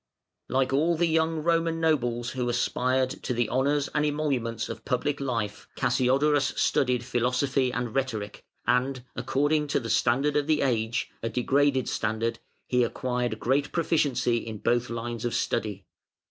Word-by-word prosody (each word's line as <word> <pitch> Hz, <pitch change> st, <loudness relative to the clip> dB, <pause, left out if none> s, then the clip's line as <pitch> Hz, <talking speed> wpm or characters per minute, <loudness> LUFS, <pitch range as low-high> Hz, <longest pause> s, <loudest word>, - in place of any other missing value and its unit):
] -, -, -59 dB
Like 130 Hz, 0 st, +1 dB
all 160 Hz, +4 st, +2 dB
the 170 Hz, -, +3 dB
young 160 Hz, -1 st, +1 dB
Roman 165 Hz, 0 st, +1 dB
nobles 120 Hz, -7 st, 0 dB
who 125 Hz, -2 st, -2 dB
aspired 130 Hz, +2 st, +1 dB
to 125 Hz, -, -2 dB
the 120 Hz, -1 st, +1 dB
honours 140 Hz, +2 st, +1 dB
and 150 Hz, -, +1 dB
emoluments 140 Hz, -7 st, -1 dB
of -, -, -7 dB
public 140 Hz, +3 st, -1 dB
life, 115 Hz, -7 st, -3 dB
Cassiodorus 135 Hz, +3 st, +2 dB
studied 125 Hz, -2 st, +1 dB
philosophy 125 Hz, +1 st, +1 dB
and 125 Hz, -2 st, -3 dB
rhetoric, 110 Hz, -7 st, -3 dB, 0.2 s
and, 125 Hz, +1 st, +1 dB
according 145 Hz, +4 st, +1 dB
to 145 Hz, -, +1 dB
the 115 Hz, -4 st, -4 dB
standard 135 Hz, +6 st, +2 dB
of 145 Hz, 0 st, +1 dB
the 155 Hz, -1 st, +2 dB
age, 115 Hz, -3 st, 0 dB
a 115 Hz, -, -2 dB
degraded 135 Hz, +2 st, +2 dB
standard, 110 Hz, +1 st, -1 dB, 0.3 s
he 125 Hz, -1 st, +2 dB
acquired 125 Hz, -2 st, -2 dB
great 140 Hz, +3 st, +1 dB
proficiency 145 Hz, -8 st, +1 dB
in 110 Hz, -2 st, -5 dB
both 120 Hz, +3 st, 0 dB
lines 115 Hz, 0 st, -4 dB
of 120 Hz, -, -1 dB
study. 105 Hz, -5 st, -2 dB
125 Hz, 155 wpm, -27 LUFS, 120-145 Hz, 0.3 s, the